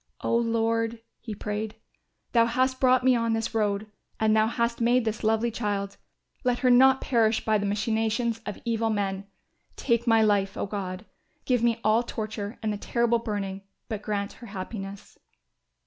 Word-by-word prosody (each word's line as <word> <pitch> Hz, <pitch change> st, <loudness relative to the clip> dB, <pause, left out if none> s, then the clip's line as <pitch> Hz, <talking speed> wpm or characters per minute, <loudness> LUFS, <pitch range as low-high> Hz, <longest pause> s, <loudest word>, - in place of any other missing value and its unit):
"O -, -, 0 dB
Lord," 230 Hz, 0 st, 0 dB, 0.2 s
he 220 Hz, -3 st, -7 dB
prayed, 210 Hz, +1 st, -4 dB, 0.6 s
"Thou 230 Hz, -1 st, +4 dB
hast 260 Hz, +2 st, +1 dB
brought 255 Hz, -1 st, +4 dB
me 260 Hz, -1 st, +5 dB
on 230 Hz, -1 st, +1 dB
this 225 Hz, 0 st, -2 dB
road 210 Hz, -1 st, 0 dB, 0.3 s
and 220 Hz, 0 st, +3 dB
Thou 215 Hz, 0 st, +4 dB
hast 235 Hz, 0 st, -1 dB
made 240 Hz, +1 st, +3 dB
this 220 Hz, 0 st, -2 dB
lovely 225 Hz, +2 st, +2 dB
child; 205 Hz, -3 st, -3 dB, 0.5 s
let 250 Hz, -1 st, +2 dB
her 250 Hz, -, +6 dB
not 265 Hz, +2 st, +6 dB
perish 225 Hz, -3 st, +2 dB
by 215 Hz, -1 st, +3 dB
the 205 Hz, -, -1 dB
machinations 225 Hz, +2 st, 0 dB
of -, -, -5 dB
evil 225 Hz, -1 st, 0 dB
men. 195 Hz, -2 st, -2 dB, 0.5 s
Take 235 Hz, -2 st, 0 dB
my 225 Hz, -1 st, +5 dB
life, 200 Hz, -2 st, +1 dB
O -, -, -1 dB
God, 195 Hz, -1 st, -5 dB, 0.4 s
give 250 Hz, -3 st, +2 dB
me 235 Hz, -1 st, +2 dB
all 215 Hz, +2 st, +4 dB
torture 215 Hz, -2 st, -5 dB
and 215 Hz, -1 st, 0 dB
the -, -, -4 dB
terrible 235 Hz, +2 st, +1 dB
burning, 200 Hz, -4 st, -4 dB, 0.3 s
but 215 Hz, -3 st, -3 dB
grant 205 Hz, -1 st, -3 dB
her 240 Hz, -, -12 dB
happiness." 195 Hz, 0 st, -7 dB
225 Hz, 170 wpm, -26 LUFS, 210-235 Hz, 0.6 s, her